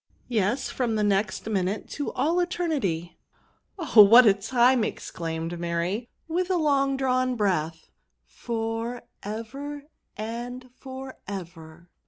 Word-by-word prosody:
'* - - -37
Yes> 235 +3 0
from 240 -4 -1
the 215 - +1
next 200 0 0
minute 200 -1 -1
to 290 - -3
all 310 +7 +1
eter 355 0 0
nity." 175 - -2 0.3
" - - -42
Oh! 305 - +6
what 230 +5 +9
a 205 - +7
time!" 240 +5 +3
exelaimed 165 -4 -4
Mary, 175 +7 -2 0.2
with 355 +3 -1
a 370 - +2
long 275 -4 +2
drawn 255 -1 +1
breath; 165 - -1 0.2
'* 60 -1 -51
for 225 - -4 0.2
ever! 270 +8 -6 0.3
and 245 +3 -6
for 265 0 -8
ever!" 170 -3 -9
225 Hz, 140 wpm, -26 LUFS, 185-260 Hz, 0.3 s, what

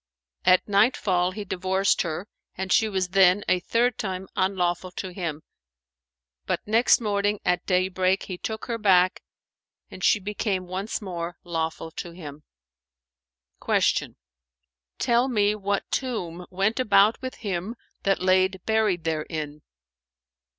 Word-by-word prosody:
At 185 0 +5
nightfall 200 -4 +2
he 205 +2 -6
divorced 190 +1 +1
her 170 +3 -4 0.3
and 190 0 -1
she 220 -2 +3
was 190 -3 -1
then 190 +1 +5
a 185 - +3
third 235 +5 0
time 190 -2 -4
unlawful 185 -1 0
to 185 0 -6
him; 165 -5 -4 1.0
but, - - 0
next 225 +3 +4
morning 205 -2 0
at 180 0 0
daybreak, 185 +1 +1
he 180 -2 -7
took 220 0 -5
her 230 -2 -3
back, 185 -3 +4 0.7
and 185 - -9
she - - +4
became 200 -1 -2
once 190 +4 -4
more 175 -2 -5
lawful 165 -1 -3
to 170 - -6
him." 150 -4 -9 1.2
Q - - +1 0.8
"Tell 240 0 +2
me 210 -5 +2
what 200 -1 -1
tomb 180 -10 -3
went 195 +6 0
about 215 -2 +4
with 260 0 -5
him 200 +1 -4 0.3
that 195 -2 +1
lay 185 0 +4
buried 190 -1 0
therein?" 155 -1 -3
190 Hz, 130 wpm, -25 LUFS, 180-210 Hz, 1.2 s, At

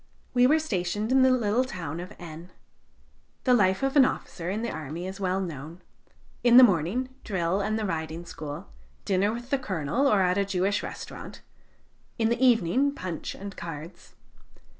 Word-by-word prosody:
We 245 0 +5
were 305 +4 +5
stationed 210 - -2
in 265 0 +5
the 260 - +6
little 240 -1 +2
town 170 - -5
of 180 +3 -7
N. 170 +1 -10 0.9
The 255 - +4
life 190 -2 +3
of 270 +1 0
an 280 - +8
officer 175 -8 -2
in 210 +4 -2
the 235 - -2
army 155 +4 -5
is 190 +1 -6
well 190 -1 0
known. 165 -2 -6 0.6
In 240 0 +7
the 255 - +11
morning, 205 +5 +2
drill 185 -1 0
and 215 +2 -1
the 220 - -2
riding 165 -1 -4
school; 160 +2 -7 0.3
dinner 200 +1 +2
with 240 +3 -7
the 275 - +2
Colonel 200 - 0
or 205 -7 +4
at 180 +2 +2
a - - +3
Jewish 195 +1 0
restaurant; - - -8 0.7
in 225 -1 +2
the 235 +2 0
evening, 255 +4 +3
punch 180 - -5
and 200 0 -8
cards. 165 +1 -9
195 Hz, 175 wpm, -27 LUFS, 170-240 Hz, 0.9 s, the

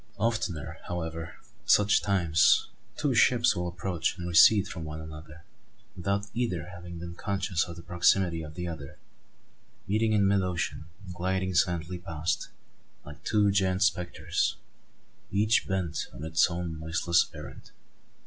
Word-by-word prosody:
Oftener, 90 -8 -2
however, 80 -1 -5 0.3
at - - -15
such 105 0 +5
times, 85 -6 +3 0.3
two 145 -3 +1
ships 120 0 +4
will 90 0 -2
approach 85 0 -2
and 85 -1 -5
recede 95 +4 +6
from 85 -4 -6
one 75 0 -6
another, 80 +1 -10 0.5
without 100 +3 -1
either 90 -10 -2
having 85 0 -9
been 85 +1 -7
conscious 95 -1 -1
of 85 - -8
the 85 - -11
proximity 90 -1 +2
of 75 -1 -9
the 90 0 -4
other, 75 -5 -7 0.9
meeting 110 +2 +1
in 100 -2 +3
mid 100 0 +3
ocean 90 -3 -3 0.2
and 90 - -8
gliding 95 +1 -1
silently 90 0 0
past, 80 -1 -3 0.6
like 75 0 -11
two 105 -2 +3
giant 95 -1 +2
spectres, 90 -3 0 0.8
each 105 +3 +2
bent 90 -6 -2
on 70 - -9
its 80 +1 +3
own 85 -2 -4
noiseless 85 +2 +1
errand. - - -10
90 Hz, 145 wpm, -28 LUFS, 80-100 Hz, 0.9 s, recede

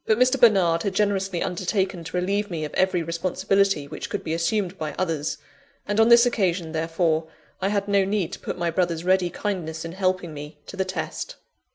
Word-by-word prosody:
But 220 - +4
Mr. 255 +2 +3
Bernard 185 -7 +5
had 195 0 -2
generously 195 -3 +1
undertaken 185 0 -1
to 160 +3 -4
relieve 200 +3 0
me 160 -4 -3
of 150 - -8
every 185 -2 +2
responsibility 175 0 +1
which - - -6
could - - -3
be 160 - -2
assumed 180 +3 0
by 155 -1 -3
others; 160 -5 -1 0.5
and 205 +1 0
on 225 +1 +6
this 235 0 +8
occasion, 185 -8 0
therefore, 160 0 0 0.3
I 190 - +1
had 200 -1 0
no 200 -1 +3
need 195 -3 -1
to - - -6
put - - -5
my 170 -1 0
brother's 170 -1 0
ready 185 0 +3
kindness 165 -4 -4
in 165 - -5
helping 185 -2 -1
me 150 +1 -8
to - - -9
the 190 0 0
test. 185 - -4
185 Hz, 200 wpm, -24 LUFS, 165-200 Hz, 0.5 s, this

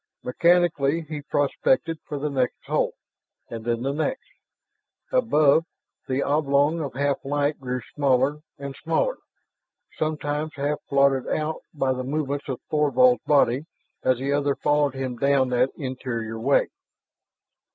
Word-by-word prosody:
Mechanically 170 0 +2
he 155 -2 -6
prospected 145 +2 0
for 145 - -4
the 150 +1 -2
next 130 -3 0
hold, - - 0 0.6
and 115 -1 -6
then 120 0 -1
the 135 +1 -1
next. 160 - -2 0.9
Above, 160 - +4 0.4
the 130 +1 0
oblong 145 +2 +2
of 140 -4 -5
half 140 +1 0
light 145 +1 0
grew 125 -1 -3
smaller 140 +1 +2 0.2
and 140 -1 -7
smaller, 165 - 0 0.8
sometimes 155 0 -2
half 145 +1 -1
blotted 140 -1 +3
out 155 +1 -2
by 135 -4 0
the 130 0 -4
movements 145 +1 -3
of 130 - -3
Thorvald's 155 - +4
body 140 0 +3 0.4
as 130 -1 +3
the 135 +3 -1
other 145 -1 +1
followed 145 -2 +1
him 130 -2 -4
down 135 0 +2
that 125 +1 +2
interior 120 -5 -4
way. 135 +5 +2
140 Hz, 135 wpm, -24 LUFS, 130-150 Hz, 0.9 s, Above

